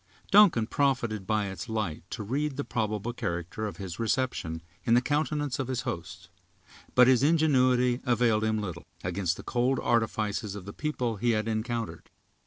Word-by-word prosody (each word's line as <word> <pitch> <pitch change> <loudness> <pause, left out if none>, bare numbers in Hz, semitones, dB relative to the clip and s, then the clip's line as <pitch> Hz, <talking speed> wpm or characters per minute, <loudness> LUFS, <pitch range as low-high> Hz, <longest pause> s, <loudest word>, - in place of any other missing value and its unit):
Duncan 200 - +6
profited 120 -6 0
by 110 -1 +1
its 95 -2 -6
light 110 -8 -2
to 110 - -5
read 140 +6 -2
the 145 - -1
probable 110 -1 -2
character 90 +1 -3
of 105 - -7
his 95 -3 -6
reception, 110 -9 -1 0.2
in 115 -2 +4
the - - +7
countenances 145 0 -1
of 135 - -1
his 130 -2 -2
hosts. 85 +1 -6 0.7
But 125 - +8
his 130 -1 +5
ingenuity 130 -5 +3
availed 120 -4 +2
him 110 0 +1
little, 90 -5 -6 0.2
against 90 0 -1
the - - -9
cold 125 +1 +1
artifices 110 -3 0
of 100 -3 -8
the 100 - -7
people 125 -7 -2
he 120 +3 +2
had 110 +1 -2
encountered. 115 +1 -3
115 Hz, 170 wpm, -28 LUFS, 100-130 Hz, 0.7 s, But